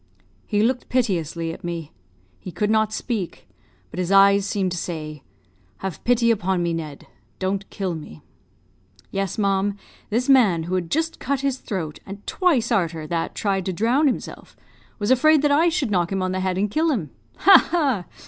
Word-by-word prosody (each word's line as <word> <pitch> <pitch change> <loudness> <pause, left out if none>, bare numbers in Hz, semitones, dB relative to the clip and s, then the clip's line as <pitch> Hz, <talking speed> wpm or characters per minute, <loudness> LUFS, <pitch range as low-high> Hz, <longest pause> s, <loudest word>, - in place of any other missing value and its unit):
He 210 -1 +1
looked 250 +2 0
piteously 170 - -1
at 190 - -12
me; 170 -3 -5 0.5
he 180 - -8
could 210 +5 -1
not 220 -1 +2
speak, 215 -5 -4 0.4
but 180 - -6
his 180 0 -1
eyes 200 0 +5
seemed 195 -3 -1
to 175 - -3
say, 155 -4 -5 0.6
'Have 190 -4 -6
pity 235 -1 +3
upon 190 -4 0
me, 170 -1 0
Ned; 155 -4 -6 0.3
don't 195 +1 -2
kill 190 -4 -3
me.' 150 - -9 0.9
"Yes, 195 -2 -2
ma'am; 200 -1 +1 0.3
this 235 +4 0
man, 220 -12 +4
who 175 +3 -5
had 180 -3 -1
just 325 +2 -1
cut 280 -1 -1
his 275 -2 -1
throat, 165 -8 -5
and 200 +1 -10
twice 285 - +1
arter 165 -7 0
that 165 +1 -3
tried 195 -3 0
to 190 - -1
drown 240 - +2
himself, 265 - -4 0.4
was 205 +2 -1
afraid 300 +3 +5
that 295 - +3
I 320 +4 +4
should 305 -9 -1
knock 175 -2 +1
him 190 -1 -1
on 185 - -1
the 185 - -2
head 185 -1 -1
and 200 +1 0
kill 320 +5 +1
him. 195 - -2 0.3
Ha! 390 - +7
ha! 275 - +1
195 Hz, 185 wpm, -23 LUFS, 175-245 Hz, 0.9 s, Ha